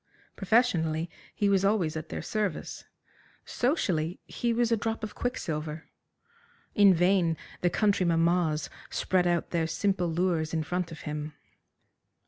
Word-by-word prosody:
Professionally, 175 -7 +1 0.2
he 205 - +1
was 195 -1 +3
always 195 -6 +1
at 155 0 -5
their - - -5
service. 210 -6 -3 0.6
Socially, 185 - 0
he 240 -1 -2
was 235 0 +1
a - - +5
drop 225 +1 -3
of 215 - -4
quicksilver. 155 -10 -4 0.8
In 200 -2 +7
vain 175 -2 +3 0.2
the 175 - +3
country 200 -1 +2
mammas 165 -2 +2 0.2
spread 180 -1 +1
out 175 -1 0
their 165 -2 +1
simple 180 +2 0
lures 165 -1 0
in 160 - 0
front 175 +2 -2
of 160 - -9
him. 150 0 -5
175 Hz, 135 wpm, -28 LUFS, 160-205 Hz, 0.8 s, In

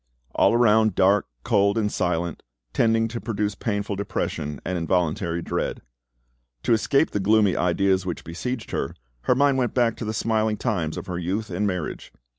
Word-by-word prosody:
—all - - +4
around 110 -3 +4
dark, 100 +2 +3 0.2
cold, 100 +2 +2
and 105 -2 +1
silent, 85 -2 -1 0.3
tending 115 0 +3
to 115 +1 -5
produce 105 -2 -1
painful 100 -1 -2
depression 75 -7 -3
and 90 - -2
involuntary 85 -1 0
dread. - - -3 0.8
To - - +3
escape 135 +7 +2
the 105 - -1
gloomy 105 -1 +3
ideas 95 +2 +2
which 90 -3 -4
besieged 115 +8 -5
her, - - -2 0.3
her - - +4
mind 140 0 +3
went 125 -3 -1
back 120 -3 +2
to 115 - -5
the 110 - -2
smiling 110 -1 0
times 90 -10 -1
of - - -5
her 90 -2 -4
youth 95 +5 -3
and 100 +4 0
marriage. 90 -5 -4
105 Hz, 170 wpm, -24 LUFS, 90-110 Hz, 0.8 s, all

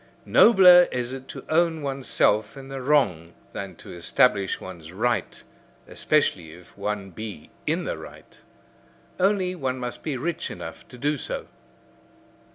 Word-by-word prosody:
Nobler 180 -5 +7
is 125 0 -2
it 135 0 -8
to - - -9
own 160 -1 +1
oneself 135 -5 +1
in 135 0 -10
the 135 -1 -5
wrong 100 - +1 0.2
than 95 -2 -6
to - - -11
establish 100 +3 +2
one's 85 -4 -10
right, 120 +6 -1 0.4
especially 90 - 0
if 90 +1 -16
one 100 -1 -4
be 105 -3 -8 0.2
in - - 0
the - - -4
right. - - -13 0.8
Only, 190 -1 +2
one 130 -7 -3
must 125 -1 -5
be 145 -4 -3
rich 165 +6 -3
enough - - -9
to 125 - -13
do 145 +2 -1
so. - - -4
125 Hz, 145 wpm, -25 LUFS, 100-150 Hz, 0.8 s, Nobler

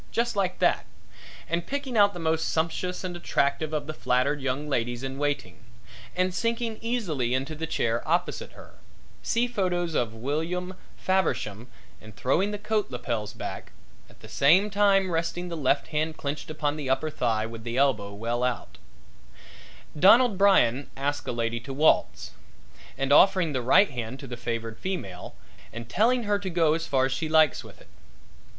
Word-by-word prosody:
just 235 -1 0
like 190 -2 0
that, - - +1 0.6
and 170 +1 -2
picking 280 -3 -3
out 205 -2 +6
the - - -6
most 160 -1 0
sumptuous 170 +3 -2
and 180 -1 -4
attractive 155 -2 0
of 150 -2 -2
the 155 - -5
flattered 140 +1 0
young 135 +2 -2
ladies 120 -2 -1
in 135 +1 -5
waiting; 145 -5 -3 0.5
and 185 0 +1
sinking 230 +2 -2
easily 165 - -1
into 135 +4 -2
the 160 +1 -5
chair 115 -6 0
opposite 175 +2 -1
her - - -14 0.5
see 235 +1 +1
photos 180 -7 -1
of 115 -6 -1
William 165 +9 -3 0.2
Faversham 120 - -1 0.3
and 110 -1 -13
throwing 175 +10 +1
the 210 - -3
coat 210 0 -1
lapels 120 -4 -3
back, - - -7 0.4
at - - -21
the - - -11
same 185 +9 +4
time 195 -2 +3
resting 170 +2 -2
the 170 - -4
left 140 -1 +1
hand 155 0 -1
clenched 145 +1 -4
upon 150 -1 -2
the 145 -3 -4
upper 135 +4 0
thigh 115 -5 0
with 115 0 -8
the 120 +1 -4
elbow 120 -8 +2
well 115 +4 -2
out 125 -1 -3 1.2
Donald 225 +5 +6
Brian 180 -10 +3
asking 145 0 -2
a 120 - -6
lady 115 0 -1
to 135 +4 -8
waltz 155 +3 +2 0.7
and 135 +1 +1
offering 180 -2 +5
the 130 - -1
right 140 - +5
hand 125 +1 -5
to 140 - -8
the 125 -2 -6
favored 115 -1 -4
female 100 - -5 0.4
and 115 0 -8
telling 235 - +2
her 205 -1 +1
to 195 -2 -4
go 165 -3 +3
as 165 +1 -2
far 130 -2 +2
as 135 - -2
she 155 +4 -2
likes 155 -3 +4
with - - -14
it. - - -18
155 Hz, 175 wpm, -26 LUFS, 125-185 Hz, 1.2 s, out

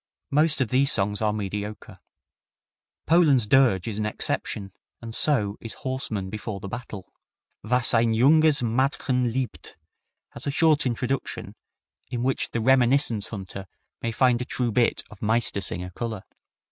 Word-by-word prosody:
Most 150 0 +2
of 125 - 0
these 135 +2 +3
songs 105 0 +1
are 105 -1 +2
mediocre. 105 0 -5 1.1
Poland's 150 -8 +4
Dirge 115 -5 +3
is 110 -2 -3
an 105 - -1
exception, 100 -1 -3 0.3
and 115 -1 -8
so 110 -8 +1
is 115 - -5
Horsemen 115 -8 -4
Before 105 -1 -5
the 100 - -7
Battle. 105 -3 -8 0.5
"Was 125 +4 +2
ein 115 0 +3
junges 150 +3 +4
Madchen 125 0 0
liebt" 130 -2 -5 0.5
has - - -8
a - - +2
short 150 -1 +3
introduction, 125 +2 -3 0.6
in 120 -1 -3
which 135 +1 -1
the 115 - -2
reminiscence 125 -3 +3
hunter 95 -2 -8 0.3
may 115 - -2
find 125 +1 +2
a - - 0
true 125 -2 -1
bit 120 +2 +2
of 105 - -13
"Meistersinger" 100 -5 0
color. 110 -3 -5
115 Hz, 145 wpm, -25 LUFS, 105-130 Hz, 1.1 s, Poland's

